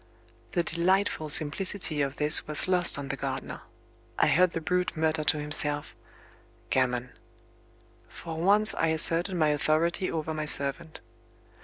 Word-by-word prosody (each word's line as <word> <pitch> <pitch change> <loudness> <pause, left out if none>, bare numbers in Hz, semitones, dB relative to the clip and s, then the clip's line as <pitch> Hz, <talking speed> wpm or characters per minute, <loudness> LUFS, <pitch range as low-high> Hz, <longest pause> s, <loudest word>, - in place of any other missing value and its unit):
The 175 - -1
delightful 170 -1 -2
simplicity 155 +1 +2
of 140 -1 -4
this 150 +1 +5
was 150 +3 -3
lost 180 -4 +2
on 140 -1 -8
the - - -4
gardener. - - -7 0.6
I - - +1
heard 180 +2 +1
the - - -4
brute 180 +1 -4
mutter 155 0 -2
to 150 - +1
himself: 145 0 -2 0.8
"Gammon!" 125 -1 -2 1.0
For 165 -1 -10
once 200 +6 +2
I 165 - -2
asserted 165 +3 +5
my 155 -3 0
authority 155 +5 -2
over 160 -1 -5
my 155 0 -5
servant. 140 +2 +1
160 Hz, 140 wpm, -25 LUFS, 150-175 Hz, 1.0 s, this